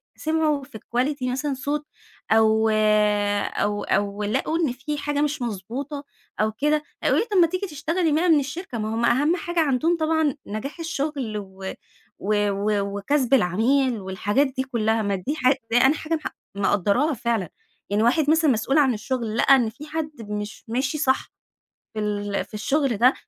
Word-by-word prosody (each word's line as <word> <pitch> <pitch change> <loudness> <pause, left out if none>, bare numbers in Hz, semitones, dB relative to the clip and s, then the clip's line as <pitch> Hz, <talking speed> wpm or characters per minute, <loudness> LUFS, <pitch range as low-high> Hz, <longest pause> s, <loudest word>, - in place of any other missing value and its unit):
سمعوا 310 -2 0
في 265 -4 -10 0.2
quality 265 +2 0
مثلًا 280 +3 -1
صوت 290 +3 -3 0.5
أو 220 0 +4 0.8
أو-أو 205 0 -1
لقوا 215 +10 0
إن 315 -7 +1
في 275 +5 -4
حاجة 290 0 -1
مش 295 -1 -1
مضبوطة 245 - -4 0.4
أو 215 0 +2
كده، 295 +7 0 0.2
هيقولوا - - +3
لي: - - -8
"طيب، 395 - +4
ما 335 - +6
تيجي 370 +4 -3
تشتغلي 325 +2 -1
بقى 325 +4 +2
من 315 -3 +6
الشركة." 285 0 -5
ما 220 0 -2
هم 235 +1 +1
أهم 290 +8 +3
حاجة 345 0 -2
عندهم 315 +3 +2
طبعًا 315 -3 +1
نجاح 215 +10 -5
الشغل 285 -8 -3
و 190 -1 -7 0.5
و 205 0 +1
و 200 0 -1
وكسب 270 +5 0
العميل 240 +4 +3
والحاجات 205 +8 0
دي 260 0 -3
كلها، 225 -4 0
ما 200 -2 0
دي 195 +11 -3
حاجة 265 -2 +2
أنا 260 +4 +5
حاجة 315 +2 -2
مح 310 - -5 0.2
مقدراها 205 - +2
فعلًا 230 - -1 0.4
يعني 205 +2 +1
واحد 280 +6 +3
مثلًا 315 -2 +4
مسؤول 245 +5 +1
عن 275 -4 +4
الشغل 230 0 -3
لقى 275 - +6
إن 240 -4 +2
في 260 +8 -11
حد 310 0 -3 0.2
مش 210 -1 -5
ماشي 260 +6 -1
صح 265 -3 0 0.6
في 220 - -4
ال 205 -1 -2
في - - -27
الشغل 265 +3 0
ده، 250 +5 +5
260 Hz, 170 wpm, -24 LUFS, 215-300 Hz, 0.8 s, ما